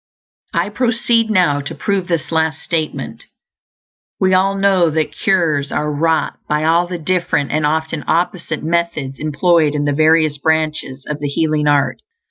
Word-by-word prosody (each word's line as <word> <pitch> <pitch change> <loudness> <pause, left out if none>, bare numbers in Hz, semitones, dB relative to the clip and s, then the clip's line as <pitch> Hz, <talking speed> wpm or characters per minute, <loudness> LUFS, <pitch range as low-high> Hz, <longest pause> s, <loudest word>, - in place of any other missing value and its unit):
I - - +1
proceed 230 0 +1
now 175 -8 +2
to 140 - -6
prove 195 -3 -1
this 170 -4 -2
last 160 0 0
statement. 160 -2 -3 0.9
We 190 -1 +2
all 195 +1 +3
know 195 -3 +3
that 155 0 -1
cures 165 -9 0
are 150 0 -1
wrought 160 +2 0
by 150 0 +1
all 170 +2 +2
the 180 0 -4
different, 165 -4 -1
and 150 0 +1
often 160 0 -2
opposite, 170 -2 -1
methods 160 -5 -2
employed 155 0 +2
in 145 0 -1
the 145 - +1
various 155 -1 +3
branches 155 -4 -1
of 150 -1 -4
the 145 - -2
healing 150 +1 0
art. 145 -1 +1
160 Hz, 155 wpm, -17 LUFS, 150-175 Hz, 0.9 s, all